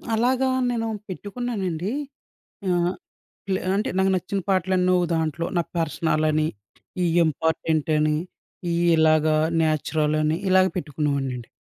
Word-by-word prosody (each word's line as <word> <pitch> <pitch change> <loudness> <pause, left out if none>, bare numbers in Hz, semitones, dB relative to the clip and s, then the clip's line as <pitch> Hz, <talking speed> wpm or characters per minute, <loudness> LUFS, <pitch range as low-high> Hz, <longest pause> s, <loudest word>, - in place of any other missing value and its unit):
అలాగా 255 +3 +2 0.2
నేను 230 -2 -1 0.2
పెట్టుకున్నానండి. 200 -3 -3 0.8
ఆహ్, 175 0 +2 0.6
ఇల 190 - +2 0.2
అంటే 210 - 0
నాకు 190 0 +3
నచ్చిన 185 +2 -2
పాటలన్నీ 185 -1 +2
ఓహ్! 175 - 0
దాంట్లో. 160 0 -1
నా 170 - +4 0.2
పర్సనలని, 155 -1 +1 0.6
ఈ - - +2 0.2
ఇంపార్టెంటని, 155 -1 +1 0.6
ఈ - - 0 0.2
ఇలాగ 155 -1 +4 0.4
న్యాచురలని, 155 0 +1
ఇలాగ 185 0 +5
పెట్టుకునేవాడినండి. 140 -6 -2
165 Hz, 105 wpm, -24 LUFS, 155-190 Hz, 0.8 s, ఇలాగ